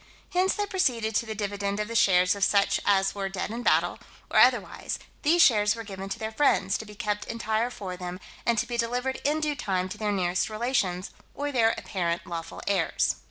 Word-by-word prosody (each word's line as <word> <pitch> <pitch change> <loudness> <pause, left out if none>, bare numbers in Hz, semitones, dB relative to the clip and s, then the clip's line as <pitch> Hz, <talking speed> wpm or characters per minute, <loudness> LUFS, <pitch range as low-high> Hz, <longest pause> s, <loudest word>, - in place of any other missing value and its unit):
Hence 370 +1 +2
they 415 - -1
proceeded 250 - 0
to 235 +2 0
the 220 - -4
dividend 200 0 -2
of 210 - -1
the 230 - -6
shares 180 -4 +4
of 200 -1 -2
such 200 0 +3
as 195 -1 +3
were 195 -1 -3
dead 195 +2 -4
in 235 +2 -4
battle, - - +2 0.3
or - - +4
otherwise: - - +2 0.2
these 330 +3 +5
shares 210 -5 +4
were 230 - -6
given 195 -2 -7
to 210 - -3
their 220 0 -4
friends, 215 -6 +2
to 220 - -8
be 210 - -11
kept 210 0 -2
entire 225 +1 -1
for 190 -6 -6
them, 180 0 -6 0.2
and 235 -1 +1
to 215 - +1
be 240 0 -4
delivered 245 +3 -1
in 300 +2 +1
due 305 -1 -1
time 185 -8 -1
to - - -7
their 210 -1 0
nearest 180 -1 0
relations, 215 -5 -1 0.2
or 290 0 -2
their 230 -4 +3
apparent 175 -3 -2
lawful 165 -1 -6
heirs. 190 -5 +1
210 Hz, 210 wpm, -27 LUFS, 195-235 Hz, 0.3 s, these